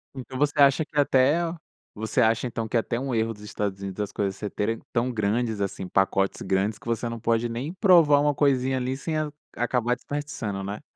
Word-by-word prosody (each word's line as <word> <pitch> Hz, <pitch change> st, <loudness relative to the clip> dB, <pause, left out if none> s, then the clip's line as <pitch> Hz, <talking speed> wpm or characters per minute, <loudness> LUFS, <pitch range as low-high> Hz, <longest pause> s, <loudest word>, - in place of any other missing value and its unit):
Então, 130 Hz, 0 st, -7 dB
você 145 Hz, +1 st, +1 dB
acha 140 Hz, +3 st, +6 dB
que 150 Hz, -1 st, -10 dB
é 145 Hz, -, +7 dB
até 140 Hz, +4 st, +3 dB, 0.5 s
você 110 Hz, +4 st, -1 dB
acha, 115 Hz, +2 st, +2 dB
então, 115 Hz, -1 st, -4 dB
que -, -, -3 dB
é -, -, +5 dB
até 115 Hz, -, -3 dB
um 135 Hz, -1 st, -3 dB
erro 115 Hz, 0 st, 0 dB
dos 105 Hz, -, -16 dB
Estados 100 Hz, -2 st, -3 dB
Unidos 95 Hz, -1 st, -5 dB
das 105 Hz, -1 st, -3 dB
coisas 100 Hz, -2 st, -1 dB
ser 105 Hz, -, -4 dB
terem 110 Hz, +2 st, -2 dB
tão 120 Hz, +2 st, +1 dB
grandes, 110 Hz, 0 st, 0 dB
assim, 95 Hz, -1 st, -3 dB
pacotes 95 Hz, 0 st, +1 dB
grandes 100 Hz, +3 st, 0 dB
que -, -, -19 dB
você 115 Hz, 0 st, -1 dB
não 115 Hz, -, -5 dB
pode 115 Hz, +1 st, +1 dB
nem 130 Hz, +9 st, -4 dB
provar 170 Hz, -7 st, +5 dB
uma 145 Hz, 0 st, +2 dB
coisinha 135 Hz, -2 st, +2 dB
ali 130 Hz, +1 st, -1 dB
sem 155 Hz, +3 st, -3 dB
a 155 Hz, -1 st, -1 dB, 0.3 s
acabar 120 Hz, 0 st, +1 dB
desperdiçando, 130 Hz, -8 st, -4 dB
né? 100 Hz, +2 st, -5 dB
120 Hz, 220 wpm, -25 LUFS, 105-140 Hz, 0.5 s, é